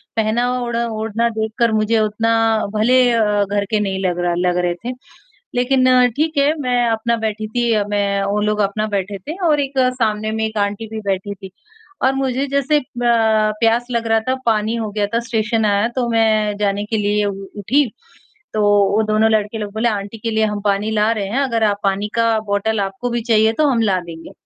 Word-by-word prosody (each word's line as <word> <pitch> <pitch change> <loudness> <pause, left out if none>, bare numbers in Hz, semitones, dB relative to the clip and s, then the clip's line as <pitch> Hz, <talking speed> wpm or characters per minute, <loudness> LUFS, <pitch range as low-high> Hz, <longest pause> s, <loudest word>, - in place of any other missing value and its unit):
पहनावा, 235 +3 0
ओढ़ा 235 0 -1
ओढ़ना 225 +1 -1
देखकर 220 +1 -1
मुझे 215 +1 +2
उतना 215 +1 0 0.4
भले 250 +4 +4 0.5
घर 200 0 +1
के 215 - +2
नहीं 195 -2 -2
लग 175 -1 -1
रहा 175 0 0
लग 180 0 +1
रहे 180 -1 +1
थे। 245 - -2 0.6
लेक़िन 255 0 +3
ठीक 310 0 0
है, 280 +2 +3
मैं 250 -3 +1
अपना 225 +1 0
बैठी 215 -1 -3
थी 235 +2 0
अ, 210 -2 +2
मैं 200 -1 0
वो 200 +1 0
लोग 210 0 0
अपना 215 +1 -2
बैठे 200 -1 -3
थे 300 - -7
और 300 -2 +3
एक 275 -1 -2 0.2
सामने 215 -2 0
में 220 0 -1
एक 220 0 -5
आंटी 205 +2 -1
भी 220 0 -6
बैठी 195 +1 -2
थी। 190 -1 -11 0.5
और 265 +1 +3
मुझे 270 0 -1
जैसे 280 +2 +1
ब - - -10 0.8
प्यास 230 +1 +2
लग 230 -1 -1
रहा 225 0 +3
था, 260 - +2
पानी 220 0 +1
हो 220 -2 -3
गया 205 0 0
था - - +3
स्टेशन 220 0 0
आया 205 +1 +2
तो 250 -2 0
मैं 215 -2 +2
जाने 205 0 -1
के 220 +1 -2
लिए 210 0 +1
उ 200 - -1 0.3
उठी, 270 +9 +2 0.7
तो 215 - 0 0.3
वो 215 - +2
दोनों 215 +1 +2
लड़के 215 0 0
लोग 210 -2 -5
बोले, 225 +2 +1
"आंटी 205 0 -4
के 225 +1 -4
लिए 220 0 +2
हम 210 -1 -2
पानी 205 +1 +1
ला 215 0 +2
रहे 205 -3 -3
हैं, 230 +7 -1
अगर 230 -5 0
आप 205 -2 +2
पानी 200 +1 0
का 230 -1 +2
बॉटल 205 +2 0
आपको 195 +5 -3
भी 240 0 -2
चाहिए, 220 -1 +3
तो 305 +6 +2
हम 250 -5 +2
ला 195 -4 +2
देंगे।" 165 -1 -10
220 Hz, 210 wpm, -19 LUFS, 205-235 Hz, 0.8 s, भले